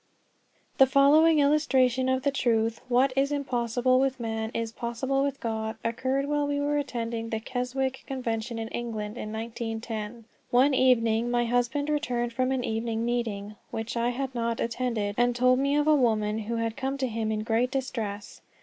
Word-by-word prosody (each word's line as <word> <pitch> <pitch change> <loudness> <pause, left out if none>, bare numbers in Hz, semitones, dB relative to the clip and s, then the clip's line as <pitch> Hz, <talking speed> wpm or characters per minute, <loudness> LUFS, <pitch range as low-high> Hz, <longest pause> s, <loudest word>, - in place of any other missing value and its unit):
THE 265 - +8
following 295 +4 +5
illustration 265 -4 +3
of 260 0 0
the 280 - +2
truth, 230 -4 0
"What 255 +2 +3
is 275 +1 +2
impossible 255 -2 +1
with 265 -1 0
man 225 -1 -3
is 230 -1 -2
possible 240 +4 -2
with 280 0 -1
God," 220 -1 -3
occurred 260 +4 0
while 295 0 0
we 285 0 -1
were 290 0 +1
attending 230 -4 -3
the 220 - -2
Keswick 260 +2 -3
Convention 235 -3 -3
in 225 0 -3
England, 220 -3 -4
in 215 -3 -6
1910. 225 0 -5 0.2
One 260 +4 +4
evening 235 -3 +3
my 240 0 +1
husband 245 +4 0
returned 245 -6 -1
from 255 +2 0
an 260 -2 0
evening 225 0 -2
meeting, 215 -4 -2
which 225 +1 -4
I 235 +1 +1
had 265 +1 -3
not 230 -1 -2
attended, 230 -3 -1
and 245 0 +3
told 255 +1 +4
me 280 +1 +1
of 295 0 +2
a 310 - +5
woman 220 -6 +2
who 225 +2 -3
had 230 -1 -2
come 270 0 -2
to 270 - -1
him 220 -2 -2
in 215 0 -2
great 230 +3 +1
distress. 225 -6 -4
240 Hz, 175 wpm, -27 LUFS, 225-265 Hz, 0.2 s, THE